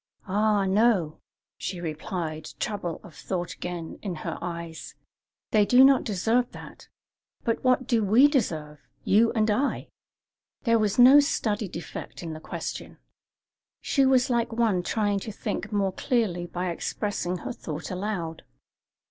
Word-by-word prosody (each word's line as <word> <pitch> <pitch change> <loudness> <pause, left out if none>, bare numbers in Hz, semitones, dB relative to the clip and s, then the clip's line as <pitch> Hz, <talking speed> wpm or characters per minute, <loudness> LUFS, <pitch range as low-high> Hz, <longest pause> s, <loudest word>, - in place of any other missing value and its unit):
"Ah, 205 +1 +2
no," 195 -5 +2 0.4
she 180 -2 -4
replied, 160 -1 -4
trouble 200 -6 -3
of 170 - -13
thought 175 +2 -4
again 175 -2 -6
in 190 -4 -4
her - - -3
eyes; 170 -2 -6 0.6
"they 215 -1 +5
do 250 +5 +6
not 270 -1 +6
deserve 225 +4 +1
that. - - -11 0.6
But 230 -2 -1
what 255 0 +3
do 230 -3 +2
we 225 +8 +6
deserve 160 - -1 0.2
you 225 +3 +4
and 220 -2 +2
I?" 265 +7 -1 0.7
There 230 -3 +3
was 210 -2 0
no 255 +4 +9
studied 215 - -1
effect 170 +1 -7
in 165 -2 -5
the 155 - -7
question. - - -6 0.8
She 275 - +1
was 260 0 +3
like 235 -1 +1
one 225 -5 +1
trying 205 +1 0
to 215 - -6
think 210 +1 -4
more 200 -2 0
clearly 200 -10 0
by 180 +1 -3
expressing 185 0 -3
her - - -3
thought 155 +1 -6
aloud. 180 -4 -3
205 Hz, 145 wpm, -26 LUFS, 175-230 Hz, 0.8 s, no